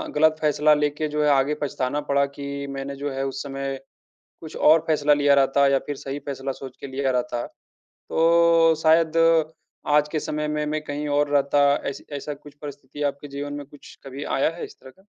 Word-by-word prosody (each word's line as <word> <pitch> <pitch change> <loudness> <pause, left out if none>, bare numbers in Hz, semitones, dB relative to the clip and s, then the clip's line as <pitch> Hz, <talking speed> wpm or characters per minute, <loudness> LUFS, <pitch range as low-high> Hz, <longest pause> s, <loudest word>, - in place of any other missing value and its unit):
गलत 155 +1 +4
फैसला 150 0 +3
लेके 150 +1 0
जो 150 0 -1
है 150 - +3
आगे 140 +1 +2
पछताना 140 0 -2
पड़ा 140 0 +3
कि 140 0 -6
मैंने 135 0 -5
जो 140 +1 -4
है 135 0 -3
उस 135 0 -4
समय 135 -1 -4 0.6
कुछ 160 -2 -10
और 160 +2 +5
फैसला 150 -2 +2
लिया 145 -1 +4
रहता 140 0 +3
या 135 0 +3
फिर 145 - -4
सही 135 +1 -6
फैसला 135 -1 -4
सोच 130 -1 -10
के - - -6
लिया 135 0 -1
रहता, 125 -1 -2 0.6
तो 165 0 +4
शायद 160 0 +4 0.7
आज 150 0 +3
के 155 - 0
समय 150 0 -3
में 150 0 -2
मैं 155 +1 -2
कहीं 145 0 -4
और 145 0 +1
रहता? 140 0 +3 0.2
ऐसी 140 - -8
ऐसा 145 +1 -5
कुछ 145 0 -15
परिस्थिति 145 -1 -9
आपके 145 0 -3
जीवन 145 +1 -6
में 145 0 -6
कुछ 145 +1 -15
कभी 135 +1 -7
आया 135 - +1
है 175 - -7
इस - - -14
तरह - - -13
का? 190 - -26
145 Hz, 200 wpm, -23 LUFS, 140-150 Hz, 0.7 s, और